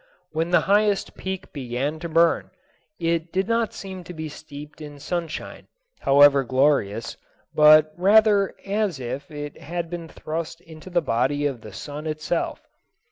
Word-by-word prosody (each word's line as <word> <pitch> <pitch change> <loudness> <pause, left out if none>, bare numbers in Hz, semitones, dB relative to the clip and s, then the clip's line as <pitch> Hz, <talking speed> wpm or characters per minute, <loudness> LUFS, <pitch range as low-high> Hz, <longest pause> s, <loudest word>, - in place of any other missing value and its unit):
When 160 +2 -1
the 175 - +4
highest 205 0 +2
peak 190 0 -6
began 135 +3 -3
to 170 +1 -5
burn, 165 +1 +3 0.5
it 165 0 -1
did 190 +1 0
not 230 -1 +1
seem 190 -2 -8
to 180 - -9
be 160 -1 -5
steeped 150 0 -11
in 145 -1 -9
sunshine, 170 +2 -5 0.3
however 140 0 +6
glorious, 130 -5 +1 0.4
but 155 0 +7
rather 200 +1 +4
as 200 -6 -1
if 130 +4 -5
it 145 -1 -7
had 170 +1 -4
been 170 -1 -5
thrust 160 +1 -5
into 160 +1 -12
the 175 -2 +1
body 140 +3 0
of 135 -5 -2
the 110 - -10
sun 145 +9 -7
itself. 155 +2 -3
155 Hz, 150 wpm, -24 LUFS, 145-175 Hz, 0.5 s, but